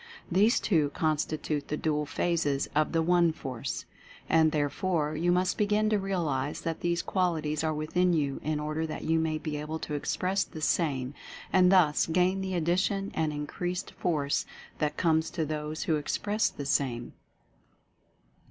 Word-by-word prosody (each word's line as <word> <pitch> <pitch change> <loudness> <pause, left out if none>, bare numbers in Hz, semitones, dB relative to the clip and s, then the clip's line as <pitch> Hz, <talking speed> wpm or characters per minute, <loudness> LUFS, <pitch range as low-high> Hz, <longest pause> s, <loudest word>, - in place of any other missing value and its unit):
These 205 +6 +4
two 155 -7 +2
constitute 155 -1 -1
the 150 - -2
Dual 150 -2 0
Phases 145 -4 0
of 155 +1 +2
the 165 -1 +2
One 175 0 +4
Force. 130 -6 -5 0.4
And, 160 -1 +4
therefore, 150 +1 0
you 170 +3 +1
must 180 +1 +1
begin 210 +1 +2
to 210 - +3
realize 160 -8 -1
that 165 -1 -3
these 170 0 0
qualities 160 -5 0
are 160 - +1
within 160 +4 +1
you 140 -4 0
in 155 0 -1
order 155 +2 -2
that 155 - -6
you 160 0 +2
may 160 -1 0
be 155 -1 -4
able 155 +2 -4
to 155 - -6
express 185 +6 0
the 160 - -10
same 145 -5 0 0.4
and 185 -1 +6
thus 170 -6 +4
gain 180 +3 +2
the 190 -1 -2
addition 185 +4 0
and 155 -1 0
increased 175 +5 -4
Force 150 -5 -1 0.3
that 150 -1 -1
comes 160 -2 +2
to 165 -3 -2
those 150 0 -3
who 160 - +1
Express 205 +8 0
the 145 - -7
same. 130 -4 -1
160 Hz, 160 wpm, -29 LUFS, 150-180 Hz, 0.4 s, and